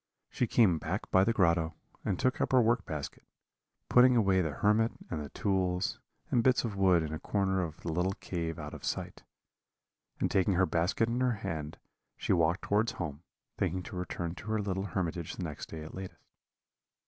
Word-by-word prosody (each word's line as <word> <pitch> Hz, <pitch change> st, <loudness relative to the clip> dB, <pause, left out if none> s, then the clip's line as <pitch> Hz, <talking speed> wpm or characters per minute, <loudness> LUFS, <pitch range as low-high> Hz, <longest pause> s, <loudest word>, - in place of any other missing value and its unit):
She 125 Hz, -, 0 dB
came 100 Hz, -9 st, +4 dB
back 90 Hz, +7 st, -4 dB
by 95 Hz, -, +6 dB
the 115 Hz, -, +2 dB
grotto, 85 Hz, -6 st, +2 dB, 0.3 s
and 90 Hz, -, 0 dB
took 130 Hz, +6 st, +1 dB
up -, -, 0 dB
her 130 Hz, -, +7 dB
work 120 Hz, +2 st, +1 dB
basket, 75 Hz, -3 st, -5 dB, 0.7 s
putting 125 Hz, 0 st, +6 dB
away 95 Hz, -5 st, +4 dB
the 80 Hz, -, 0 dB
hermit 105 Hz, +9 st, +2 dB, 0.2 s
and 75 Hz, -2 st, -2 dB
the 70 Hz, -, -8 dB
tools 95 Hz, -2 st, 0 dB, 0.3 s
and 120 Hz, -, +4 dB
bits 130 Hz, 0 st, +4 dB
of 110 Hz, -4 st, -3 dB
wood 95 Hz, -4 st, +4 dB
in 80 Hz, 0 st, -4 dB
a 80 Hz, -, -4 dB
corner 95 Hz, 0 st, 0 dB
of 80 Hz, -3 st, -5 dB
the 85 Hz, -, -3 dB
little 90 Hz, +4 st, 0 dB
cave 85 Hz, -3 st, -4 dB
out -, -, -7 dB
of -, -, -9 dB
sight; -, -, -3 dB, 1.0 s
and -, -, 0 dB
taking 95 Hz, 0 st, +3 dB
her 95 Hz, +2 st, +4 dB
basket 90 Hz, +6 st, +1 dB
in 120 Hz, +2 st, -1 dB
her 125 Hz, -1 st, +3 dB
hand, 75 Hz, -2 st, -4 dB, 0.4 s
she -, -, +1 dB
walked 85 Hz, +1 st, +2 dB
towards 110 Hz, +4 st, +1 dB
home, 80 Hz, -, -5 dB, 0.4 s
thinking 90 Hz, +2 st, 0 dB
to -, -, -8 dB
return 85 Hz, -1 st, -3 dB
to 100 Hz, -, -11 dB
her 110 Hz, 0 st, 0 dB
little 95 Hz, -1 st, -2 dB
hermitage 85 Hz, -4 st, -3 dB
the -, -, -5 dB
next 75 Hz, -4 st, -6 dB
day 80 Hz, -1 st, -7 dB
at 80 Hz, -, -9 dB
latest. 95 Hz, 0 st, -7 dB
95 Hz, 195 wpm, -31 LUFS, 85-105 Hz, 1.0 s, her